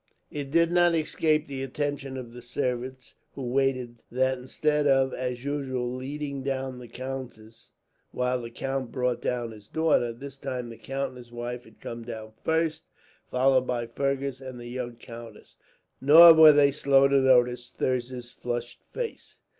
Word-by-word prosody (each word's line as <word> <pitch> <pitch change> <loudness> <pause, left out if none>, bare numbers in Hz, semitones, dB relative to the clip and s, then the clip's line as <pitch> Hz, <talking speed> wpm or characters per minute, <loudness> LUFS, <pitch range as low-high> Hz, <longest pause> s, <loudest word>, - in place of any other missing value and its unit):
It 145 -2 -5
did 170 +3 +3
not 175 -1 +4
escape 155 -1 +1
the 135 -1 -5
attention 135 0 -3
of 120 -2 -8
the 125 - -10
servants 125 +1 -4 0.2
who 135 - -5
waited 125 -2 0
that 130 +1 +1
instead 150 +3 0
of, 135 -1 +3
as 125 -1 -4
usual, 130 -4 -2
leading 140 +2 -5
down 130 -1 -3
the 125 - -10
countess 120 -3 -8 0.4
while 125 0 -1
the 115 - -7
count 135 +1 -4
brought 125 -2 -1
down 120 -2 -2
his 105 -2 -14
daughter; 155 -5 +2
this 135 +3 -10
time 130 -3 -4
the 115 - -10
count 135 +1 -3
and 130 - -13
his 120 -1 -14
wife 120 +1 -5
had - - -19
come 115 0 -7
down 110 -2 -7
first, 160 0 0 0.4
followed 130 0 +3
by 120 -1 -1
Fergus 135 +2 -2
and 130 -2 -8
the 120 - -9
young 120 -1 -5
countess. 115 -2 -12 0.5
Nor 165 +5 +10
were 160 -1 +9
they 145 -1 +5
slow 135 -1 +4
to 140 0 +3
notice 125 -2 +3
Thirza's 125 -1 -3
flushed 120 -1 -5
face. 480 -2 -6
130 Hz, 165 wpm, -27 LUFS, 120-140 Hz, 0.5 s, Nor